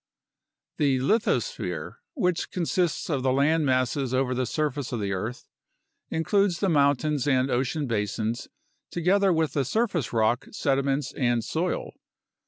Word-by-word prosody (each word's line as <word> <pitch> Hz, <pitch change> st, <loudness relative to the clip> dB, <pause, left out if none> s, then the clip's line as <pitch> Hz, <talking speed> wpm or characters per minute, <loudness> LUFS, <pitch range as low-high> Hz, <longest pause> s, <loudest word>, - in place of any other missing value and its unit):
The 140 Hz, -3 st, +3 dB
lithosphere, 220 Hz, -, -1 dB, 0.2 s
which 180 Hz, -, 0 dB
consists 175 Hz, -1 st, -1 dB
of 140 Hz, -5 st, -1 dB
the 130 Hz, 0 st, +2 dB
land 145 Hz, +3 st, +2 dB
masses 130 Hz, 0 st, +1 dB
over 130 Hz, -1 st, +1 dB
the 125 Hz, 0 st, -1 dB
surface 145 Hz, -1 st, -2 dB
of 120 Hz, -, -2 dB
the 100 Hz, -1 st, -2 dB
earth, 110 Hz, +6 st, -5 dB, 0.6 s
includes 185 Hz, +2 st, +1 dB
the 195 Hz, -, +1 dB
mountains 145 Hz, -2 st, +2 dB
and 130 Hz, -1 st, +2 dB
ocean 130 Hz, +4 st, 0 dB
basins, 110 Hz, 0 st, -2 dB, 0.4 s
together 190 Hz, +3 st, +2 dB
with 160 Hz, -3 st, +1 dB
the 140 Hz, -, +1 dB
surface 190 Hz, -, 0 dB
rock, 115 Hz, +3 st, +1 dB
sediments, 135 Hz, 0 st, 0 dB
and 120 Hz, -4 st, +1 dB
soil. 170 Hz, +8 st, -2 dB
140 Hz, 135 wpm, -26 LUFS, 125-165 Hz, 0.6 s, The